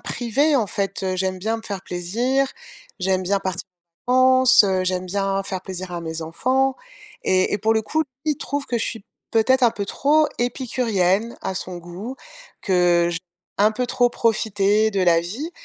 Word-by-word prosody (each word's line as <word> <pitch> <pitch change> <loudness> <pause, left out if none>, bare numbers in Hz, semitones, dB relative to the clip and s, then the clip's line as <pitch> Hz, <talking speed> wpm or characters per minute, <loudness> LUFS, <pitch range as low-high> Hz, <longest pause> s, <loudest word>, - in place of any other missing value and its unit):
priver, 270 +6 0
en 230 -5 +1
fait, 195 0 -3
heu, 185 -1 -1
j'aime 185 0 -1
bien 220 +4 -1
me 225 - -9
faire 200 -3 -5
plaisir, 235 +11 0 0.5
j'aime 185 0 0
bien 200 +2 +1
part 190 -1 -2 0.5
cances, 255 -1 +6
heu, 185 -2 +1
j'aime 185 0 -1
bien 195 +1 -1
faire 190 -1 -5
plaisir 185 -1 -6
à 170 -1 -4
mes 160 0 -5
enfants. 255 +11 0 0.5
Et 185 +1 +2
et - - -1
pour 220 +2 +2
le 220 - +2
coup, 305 +9 -1
lui 280 +2 -4
il - - -7
trouve 285 -2 -4
que 240 - -1
je 225 - 0
suis 225 -4 -5 0.3
peut-être 255 +4 +3
un 240 - +6
peu 205 -3 -5
trop 300 +7 +3
épicurienne 235 -4 0
à 190 - -3
son 180 -1 -5
goût, 180 +9 -7 0.5
que 175 -2 +3
j 170 - -3 0.4
un 210 +2 +5
peu 250 +3 -2
trop 245 0 +3
profiter 215 -2 +1
de 195 -1 +1
la 170 -2 +5
vie 225 - -5
205 Hz, 190 wpm, -22 LUFS, 185-245 Hz, 0.5 s, cances